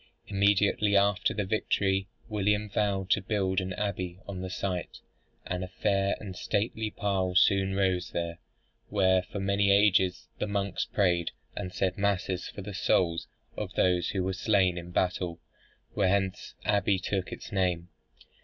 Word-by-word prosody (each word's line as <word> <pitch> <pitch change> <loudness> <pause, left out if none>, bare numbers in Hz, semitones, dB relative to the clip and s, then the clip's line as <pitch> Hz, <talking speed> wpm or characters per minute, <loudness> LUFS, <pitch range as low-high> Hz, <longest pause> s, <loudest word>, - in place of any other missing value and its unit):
Immediately 100 +1 +3
after 100 0 +2
his 105 -3 -1
victory 95 -2 +1 0.2
William 105 -1 0
vowed 100 -2 0
to - - +4
build 95 -2 0
an 95 0 -4
abbey 90 -3 -3
on 95 -2 -5
the 95 - -4
site; 90 -1 -3 0.5
and 90 0 -3
a - - -4
fair 100 +1 +1
and 95 -3 -7
stately 110 +3 -1
pile 95 -3 -1
soon 95 +1 +4
rose 95 -2 +1
there, 85 -1 -3 0.5
where 95 -2 +3
for 90 +2 -7
many 100 +1 +2
ages 100 -2 +4
the - - -1
monks 100 -2 -1
prayed, 90 -4 +1 0.3
and 90 - -4
said 95 +1 -1
masses 95 -2 0
for 100 - -8
the 100 +1 -6
souls 85 -3 +1 0.3
of - - -4
those 90 -2 +2
who 95 -2 -1
were 95 +1 -1
slain 95 -2 +2
in 85 -1 -6
the - - -10
battle, 90 -1 -1 0.5
whence 95 0 0
the - - -6
abbey 100 -1 +3
took 95 0 -2
its - - -8
name. 90 -3 0
95 Hz, 160 wpm, -29 LUFS, 90-100 Hz, 0.5 s, to